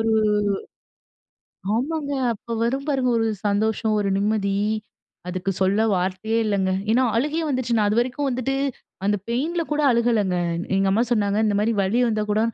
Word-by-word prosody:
ஒரு 225 0 +1 1.6
ஆமாங்க, 285 +4 -2 0.2
அப்ப 230 +2 -6
வரும் 270 +4 -1
பாருங்க, 265 -3 +1
ஒரு 225 - +1 0.2
சந்தோஷம், 215 +1 +1
ஒரு 200 - 0
நிம்மதி. 200 -1 0 0.7
அதுக்கு 185 +1 -2
சொல்ல 195 +3 +3
வார்த்தையே 190 +5 -1
இல்லைங்க. 195 -2 +1 0.2
ஏன்னா, 250 +3 +4
அழுகையே 300 +6 0
வந்துருச்சு. 255 -4 0
நான் 210 -1 +3
அதுவரைக்கும் 250 +5 0
வந்துட்டு 255 +2 -1 0.5
அந்த 205 +1 +2
பெயின்ல 310 +9 -1
கூட 300 - +1
அழுகலங்க. 230 -6 +1 0.4
எங்க 195 0 +2
அம்மா 220 +4 +3
சொன்னாங்க. 205 -2 +1
இந்த 205 - +1
மாரி 225 +2 +1
"வலி 215 +6 +1
வந்தா 215 -1 0
கூட 215 - +2
225 Hz, 150 wpm, -23 LUFS, 205-255 Hz, 1.6 s, ஏன்னா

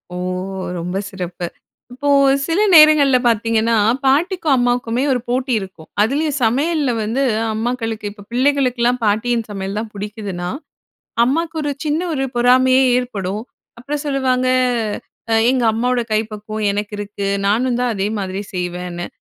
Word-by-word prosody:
ஓ! - - -4 0.6
ரொம்ப 180 +3 -3
சிறப்பு. 180 -2 -5 0.5
இப்போ 285 +3 -2 0.4
சில 335 +3 0
நேரங்கள்ல 305 -4 +7
பார்த்தீங்கன்னா, 230 0 +2 0.3
பாட்டிக்கும் 320 +3 +2
அம்மாவுக்குமே 245 0 0
ஒரு 255 - +1
போட்டி 255 +2 -1
இருக்கும். 185 -5 -10
அதுலயும் 285 +6 +1
சமையல்ல 285 +4 +1
வந்து 230 +6 0 0.3
அம்மாக்களுக்கு 225 -1 -3
இப்ப 205 -1 -14
பிள்ளைகளுக்கெல்லாம் 250 -2 +1
பாட்டியின் 225 +2 0
சமையல் 195 0 -4
தான் 220 0 -6
புடிக்குதுன்னா, 200 -3 -5 0.8
அம்மாக்கு 325 +5 -1
ஒரு 290 - -1
சின்ன 305 +1 0
ஒரு 270 -2 -1
பொறாமையே 255 +2 +4
ஏற்படும். 210 -5 -3 0.4
அப்பறம் 285 +4 -4
சொல்லுவாங்க 260 -2 +1 0.9
"அ - - +4 0.2
எங்க 255 -2 +1
அம்மாவோட 245 +2 0
கை 215 - +3
பக்குவம் 215 0 -3
எனக்கிருக்கு. 205 0 -4 0.2
நானுந்தான் 245 +3 +1
அதே 195 0 -1
மாதிரி 190 0 -3
செய்வேன்னு." 180 -1 -4
240 Hz, 125 wpm, -19 LUFS, 205-265 Hz, 0.9 s, நேரங்கள்ல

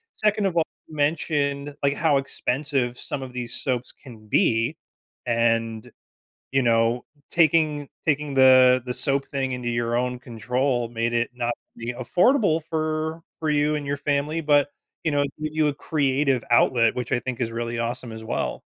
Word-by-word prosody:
2nd 210 -1 +2
of 175 -3 -3
all, 165 - +5 0.2
you 155 - -11
mentioned, 145 -1 0
like, 140 0 +3
how 150 -2 +2
expensive 135 -2 -1
some 140 - -5
of 130 -1 -8
these 120 -2 -4
soaps 125 -2 -2
can 110 -5 -15
be, 115 +6 +2 0.5
and, 115 -1 0 0.6
you 135 0 +3
know, 115 +1 +2 0.3
taking 155 -3 +2 0.2
taking 150 -1 0
the 130 -1 +6
the 125 - -2
soap 140 0 0
thing 135 -2 -2
into 125 -1 -3
your 120 0 0
own 125 0 -1
control 125 +1 -1
made 115 0 -2
it 120 0 +1
not 120 -1 -1 0.2
be 115 +1 -4
affordable 170 - +2
for 155 0 -2 0.2
for 160 -1 0
you 150 0 +2
and 150 - -3
your 140 +1 -1
family, 145 +3 0
but, 145 -2 +3 0.3
you 160 - +2
know, 145 - +2
it 140 -1 -3
gave 155 0 -2
you 155 -1 +2
a 140 - -1
creative 135 -4 +1
outlet, 120 -1 +4
which 125 -2 -4
I 125 - +3
think 130 -1 -5
is 115 -2 -1
really 115 0 -3
awesome 120 0 -3
as 110 0 -8
well. - - -2
135 Hz, 175 wpm, -24 LUFS, 120-150 Hz, 0.6 s, the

